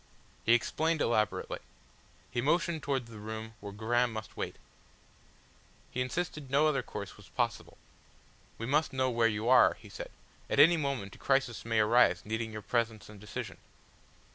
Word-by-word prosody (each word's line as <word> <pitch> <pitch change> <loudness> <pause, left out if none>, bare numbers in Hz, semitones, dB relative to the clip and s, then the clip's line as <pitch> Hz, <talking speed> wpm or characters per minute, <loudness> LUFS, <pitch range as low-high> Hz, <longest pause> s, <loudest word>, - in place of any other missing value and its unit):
He 115 - +6
explained 160 +7 0
elaborately. 110 -6 0 0.7
He 120 - 0
motioned 170 +3 +1
towards 130 -5 -2
the 110 - -9
room 110 +1 -6
where 100 0 -7
Graham 120 +4 +1
must 110 -1 -7
wait, - - -4 1.4
he 125 - -2
insisted 150 +1 -3
no 140 +3 +4
other 140 -3 +1
course - - -7
was - - -15
possible. - - -2 0.8
"We 115 - -4
must 150 +4 +1
know 130 -1 +1
where 115 -1 +3
you 110 +1 -2
are," 130 0 +6
he - - -15
said. - - -7 0.4
"At - - +1
any 165 +4 +8
moment 140 - -2
a - - -14
crisis 135 -4 +1
may 115 -1 +1
arise 110 -4 +4
needing 110 +1 -2
your 110 -1 -7
presence 115 -2 -1
and 105 -1 -12
decision." 105 +1 -6
120 Hz, 165 wpm, -31 LUFS, 110-135 Hz, 1.4 s, any